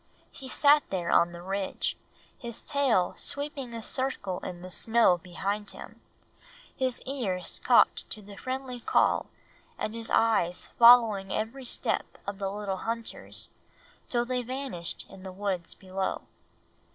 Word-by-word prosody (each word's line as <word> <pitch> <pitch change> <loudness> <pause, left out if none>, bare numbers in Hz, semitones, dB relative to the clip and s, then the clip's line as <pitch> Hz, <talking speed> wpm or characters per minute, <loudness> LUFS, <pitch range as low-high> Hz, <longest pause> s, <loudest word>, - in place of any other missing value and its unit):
He 270 - -9
sat 290 +3 +5
there 175 -3 -1
on 175 - +5
the 170 0 -9
ridge, 195 +1 -1 0.4
his 235 -2 -7
tail 265 -11 +2
sweeping 285 -3 -3
a 230 -1 -6
circle 240 -10 -2
in 175 -1 -7
the 185 - -8
snow 220 0 +3
behind 200 +4 -3
him, - - -8 0.7
his 260 -2 -1
ears 200 -10 -2
cocked - - +4
to 215 - -7
the 200 0 -11
friendly 255 +1 -4
call - - +2 0.5
and 215 - -3
his 230 0 -4
eyes 210 -6 +2
following 230 -5 +7
every 240 +5 -3
step - - -1
of 200 0 -5
the 195 -1 -1
little 200 -2 -3
hunters, 230 +2 -3 0.6
till 240 -1 +1
they 250 0 -1
vanished 250 -9 -4
in 190 - -13
the 190 0 -7
woods 185 -2 -3
below. 190 0 -3
215 Hz, 140 wpm, -29 LUFS, 190-250 Hz, 0.7 s, following